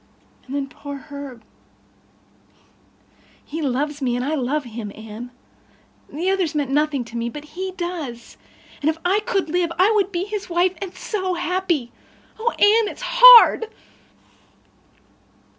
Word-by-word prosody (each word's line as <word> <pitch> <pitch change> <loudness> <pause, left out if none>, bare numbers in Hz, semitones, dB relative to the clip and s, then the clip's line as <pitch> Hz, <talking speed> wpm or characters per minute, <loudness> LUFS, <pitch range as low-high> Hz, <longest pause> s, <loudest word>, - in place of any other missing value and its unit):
And 270 - -6
then 280 -1 -2
poor 285 +1 -9
Herb—he—he 280 +3 -14
loves 290 +2 -2
me 245 -2 0
and 245 +1 -2
I 300 - -1
love 290 +1 -1
him, 225 -4 -7
Anne. 220 +2 -9 0.8
The 345 +6 -1
others 360 -5 -1
meant 285 -3 -1
nothing 290 -2 +1
to 235 - -12
me, 235 0 -2
but 295 +4 -9
he 375 +4 -6
does—and 305 -3 -6
if 320 - -1
I 385 +4 +3
could 425 -5 -1
live 345 0 0
I 380 +5 +4
would 400 -3 +1
be 350 -1 -2
his 410 -1 -5
wife 350 +1 +2
and 390 - -4
be - - -19
so 375 -4 -3
happy. 345 -7 -1 0.5
Oh, 465 +2 +1
Anne, 430 +2 +4
it's - - -11
hard." - - +8
315 Hz, 140 wpm, -21 LUFS, 270-375 Hz, 0.8 s, hard